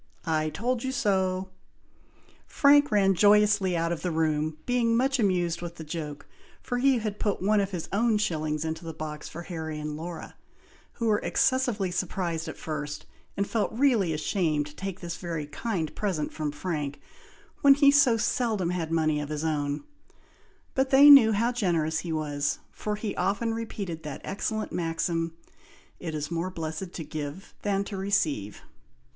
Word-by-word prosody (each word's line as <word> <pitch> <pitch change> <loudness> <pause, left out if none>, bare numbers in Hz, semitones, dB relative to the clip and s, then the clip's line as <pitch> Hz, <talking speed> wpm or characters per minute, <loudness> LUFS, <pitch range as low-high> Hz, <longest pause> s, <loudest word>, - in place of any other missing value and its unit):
I 155 -2 +1
told 235 +7 -2
you 260 - -1
so!" 190 -5 0 1.0
Frank 290 0 +5
ran 195 -2 +4
joyously 205 -1 +4
out 165 0 0
of 170 - -3
the 180 - -1
room, 155 -1 0
being 235 -2 +2
much 265 +2 +2
amused 175 -5 +1
with 170 -1 -6
the 165 - -8
joke, 150 -2 -6 0.3
for 245 -1 -3
he 270 0 +4
had 215 -2 -3
put 205 -2 0
one 210 +3 +2
of 195 -1 0
his 180 -4 -5
own 220 +1 +3
shillings 155 -6 -1
into 160 +1 -4
the 165 -1 -6
box 150 -1 -6
for 170 +2 -8
Harry 160 -4 -5
and 150 0 -4
Laura, 165 +2 -7 0.6
who 230 - -4
were 210 -2 +3
excessively 240 -8 +1
surprised 175 -2 -2
at 160 - -6
first, 150 -1 -5 0.3
and 200 0 0
felt 220 -3 0
really 230 -8 +3
ashamed 155 -1 0
to 150 0 -12
take 195 -1 -5
this 170 -1 -5
very 165 -4 -4
kind 165 0 -3
present 180 -8 -2
from 155 -2 -2
Frank, 150 -2 -4 0.6
when 280 -1 +8
he 280 0 +6
so 280 -5 +5
seldom 220 -5 0
had 165 -3 -3
money 155 -2 +2
of 145 - -5
his 150 0 -3
own; 145 - -1 0.9
but 265 0 +1
they 280 +2 +9
knew 245 -6 +9
how 230 +3 +2
generous 165 -9 0
he 165 0 -5
was, 145 -2 -1
for 210 0 -3
he 210 -1 -4
often 225 +3 0
repeated 200 -7 -5
that 150 -3 -7
excellent 215 +2 -3
maxim, 165 -1 -1 0.7
"It 165 -3 -5
is 150 +2 -4
more 170 +2 -1
blessed 165 +1 -5
to 165 - -5
give 155 +4 -6
than 200 -1 0
to 200 0 -6
receive." 155 - -1
180 Hz, 170 wpm, -27 LUFS, 155-215 Hz, 1.0 s, they